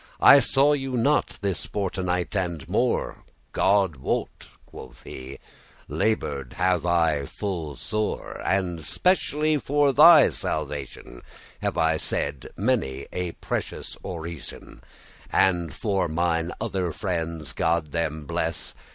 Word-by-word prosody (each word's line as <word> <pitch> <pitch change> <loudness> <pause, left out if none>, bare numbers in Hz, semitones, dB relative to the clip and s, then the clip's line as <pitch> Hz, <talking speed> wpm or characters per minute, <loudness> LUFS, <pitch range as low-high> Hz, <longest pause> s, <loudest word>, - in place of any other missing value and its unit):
I 140 - +9
saw 140 +3 +3
you 135 -2 -2
not 140 +6 +1
this 95 -3 -2
fortenight 90 -1 -2
and 85 -6 -2
more." - - 0 0.3
"God 95 -6 +2
wot," 65 - -3 0.2
quoth 65 0 -12
he, 65 +1 -8 0.5
"labour'd 70 - -1
have 90 -1 +1
I 80 -5 +2
full 85 -8 -4
sore; 110 +9 -3
And 90 -4 0
specially 155 - +1
for 145 0 +2
thy 155 +1 +8
salvation 70 -3 -5 0.4
Have - - -2
I 80 0 +3
said 70 -3 -3
many 100 - 0
a 90 -2 -3
precious - - -5
orison, 85 -3 -7 0.5
And 85 -4 +2
for 100 - -1
mine 85 +1 0
other 90 -3 -2
friendes, 85 -4 -3
God 80 -2 0
them 80 -2 -2
bless. - - -2
90 Hz, 115 wpm, -25 LUFS, 80-105 Hz, 0.5 s, I